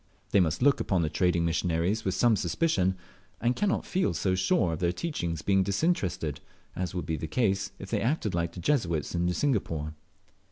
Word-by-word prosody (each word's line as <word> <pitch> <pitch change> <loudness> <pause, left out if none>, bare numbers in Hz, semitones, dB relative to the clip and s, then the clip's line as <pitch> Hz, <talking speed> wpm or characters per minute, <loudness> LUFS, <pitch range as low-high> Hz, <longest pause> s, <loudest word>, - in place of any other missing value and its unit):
They - - +5
must 85 +2 +1
look 140 0 +4
upon 95 -4 +1
the 75 - -1
trading 85 -2 +2
missionaries 85 +5 0
with 95 -1 -1
some 115 +3 +4
suspicion, 95 - +1 0.4
and 120 +2 +1
cannot 205 -1 0
feel 185 0 0
so 95 - +1
sure 95 -2 +2
of 80 - -4
their 85 -1 +1
teachings 85 - -3
being 95 +1 +3
disinterested, 95 - 0 0.4
as 90 0 -3
would 90 - -2
be 80 -2 -2
the 80 - -4
case 95 -3 0
if 95 - -9
they - - +1
acted 120 - 0
like 85 -1 -1
the - - -8
Jesuits 85 - 0
in 85 0 +1
Singapore. 85 - -1
95 Hz, 190 wpm, -28 LUFS, 85-110 Hz, 0.4 s, They